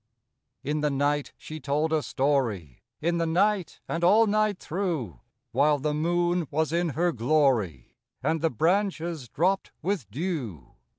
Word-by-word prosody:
T 140 - -2
N 150 0 0
the 150 - +2
night 145 +1 0
she 155 0 -8
told 150 +2 0
a 155 - +2
story, 120 - -1 0.2
In 170 +2 +1
the 165 - +1
night 190 +2 +1
and 165 +1 -2
all 210 +6 +6
night 215 -1 +1
through, 160 - -3 0.3
While 150 +1 +3
the 150 +2 -1
moon 175 +2 +1
was 160 +1 0
in 170 0 +1
her 175 +1 +2
glory, 120 - +1 0.3
And 160 -1 0
the 165 - +2
branches 170 - 0
dropped 185 - 0
with 175 - -2
dew. 125 - -4
155 Hz, 155 wpm, -27 LUFS, 140-175 Hz, 0.3 s, all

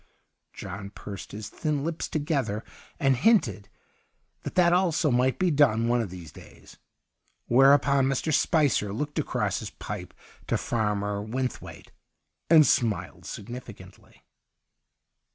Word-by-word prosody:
John 100 +1 -7
pursed 100 -1 -9
his 105 0 -7
thin 150 -4 -2
lips 165 +1 -3
together, 140 -9 -1 0.4
and 135 -1 +3
hinted 120 - +2 0.7
that - - -7
that 175 -1 +4
also 175 -4 +2
might 125 +1 +2
be 185 -2 +1
done 120 -6 +3
one 120 0 +2
of 110 - -4
these 85 -4 -10
days. - - -16 0.7
Whereupon 140 +1 +4
Mr. 135 +3 -1
Spicer 145 - +2
looked 145 +6 -3
across - - -1
his - - -6
pipe - - -8 0.3
to - - +1
Farmer 105 -2 -1
Wynthwaite, 125 +4 -5 0.6
and 155 -2 +7
smiled 115 -6 0
significantly. 105 -4 -10
125 Hz, 120 wpm, -26 LUFS, 105-150 Hz, 0.7 s, and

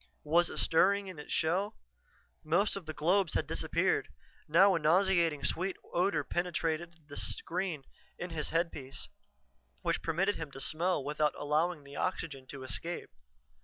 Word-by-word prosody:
Was 170 +3 +4
it - - -7
stirring 200 +5 +3
in 185 -5 -8
its 150 - -9
shell? 195 +7 +1 0.7
Most 175 +7 +2
of 190 -5 -6
the 155 - -4
globes 180 +2 +2
had - - +1
disappeared; - - +1 0.4
now 190 +6 +6
a 170 - +2
nauseatingly 165 -3 +3
sweet 185 +5 0 0.2
odor 175 -4 +2
penetrated 170 -1 -2
the 145 - -9
screen 175 -4 -1 0.3
in 175 0 -5
his 155 -2 -2
headpiece, 165 -5 -2 0.7
which - - 0
permitted 190 +5 +1
him 160 -2 -5
to 135 - -8
smell 165 +2 0
without 150 +1 0
allowing 150 +2 0
the 140 0 -10
oxygen 150 -7 -3
to 135 -1 -8
escape. 165 +7 -5
165 Hz, 150 wpm, -32 LUFS, 150-180 Hz, 0.7 s, now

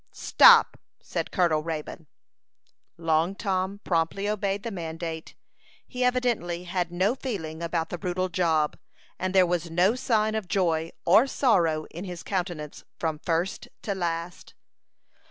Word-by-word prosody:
"Stop!" 475 -2 +6 0.2
said - - -4
Colonel 165 -4 +2
Raybone. 160 0 -6 0.9
Long 165 +2 +1
Tom 195 0 -2
promptly 170 +4 0
obeyed 200 -1 -1
the 230 - -4
mandate. 165 -2 -6 0.5
He 250 0 -3
evidently 240 -9 0
had 175 -1 -2
no 185 +6 +1
feeling 170 -12 -5
about 165 -1 -2
the 175 - -5
brutal 185 +1 -1
job, 165 -4 0 0.4
and 185 0 -2
there 185 -1 +6
was 175 -1 -1
no 180 +6 +3
sign 220 -4 +1
of 220 -4 -3
joy 165 -4 0 0.2
or 210 +10 +6
sorrow 170 - +2
in 175 +4 -7
his 180 -2 -7
countenance 175 -6 -4
from 160 -2 -2
first 170 +5 -2 0.2
to 205 - -1
last. 170 -2 -4
175 Hz, 135 wpm, -26 LUFS, 165-200 Hz, 0.9 s, Stop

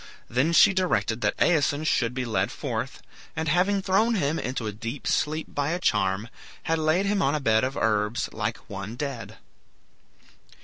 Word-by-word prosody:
Then 130 +7 +1
she 180 +3 +6
directed 120 - 0
that - - 0
Aeson 150 -3 +2
should 125 -5 +1
be 130 -1 -2
led 115 - 0
forth, - - -4 0.3
and 160 +1 -2
having 190 +5 +2
thrown 215 +5 +2
him 160 -4 0
into 125 -2 -3
a 105 - -2
deep 115 +6 -6
sleep 155 +1 -1
by 145 0 -1
a 175 - -2
charm, 95 - +1 0.4
had 165 0 0
him 155 - -2
laid 195 +6 +2
on 140 +2 +2
a - - 0
bed 110 -4 +2
of 130 +1 -2
herbs, 105 +1 0
like 110 0 -2
one 100 +3 -6
dead. 135 -3 -5
140 Hz, 175 wpm, -26 LUFS, 115-165 Hz, 0.4 s, she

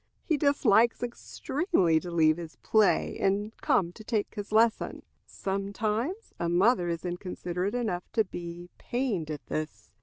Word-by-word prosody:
He 320 - +1
dislikes 245 -6 +3
extremely 240 - 0
to 175 - -7
leave 160 -2 +3
his 165 -2 -8
play 215 -2 +2
and 205 +3 0
come 175 -3 +2
to 215 - -12
take 215 -2 -1
his 205 -1 -6
lesson. 225 +1 +2 0.2
Sometimes 210 - -2
a 170 - 0
mother 180 +1 +3
is 170 +1 -3
inconsiderate 180 +2 -3
enough 215 -8 -2
to 225 - +3
be 175 -1 -8
pained 235 - -2
at 150 -1 -6
this. 155 -9 -5
200 Hz, 145 wpm, -28 LUFS, 175-230 Hz, 0.2 s, dislikes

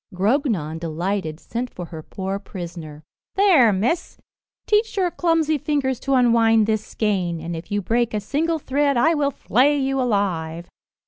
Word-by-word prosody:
Grognon, 195 - 0
delighted, 170 0 -3
sent 245 +6 -4
for 180 - -7
her 160 -1 -8
poor 190 +4 -4
prisoner. 170 -6 -8 0.3
"There, 360 - +5
miss, 235 - -1 0.5
teach 425 0 +1
your 365 -2 +1
clumsy 325 -3 +1
fingers 265 -3 -1
to 275 0 0
unwind 230 -3 +4
this 215 0 0
skein, 190 -7 -1
and 165 +1 -5
if 165 +4 -9
you 205 -1 -1
break 230 +3 0
a - - +1
single 320 +10 -1
thread 280 -1 0
I 320 +7 +4
will 290 -3 +1
flay 280 +2 +2
you 270 -1 0
alive. 175 -8 -1
225 Hz, 155 wpm, -22 LUFS, 180-280 Hz, 0.5 s, There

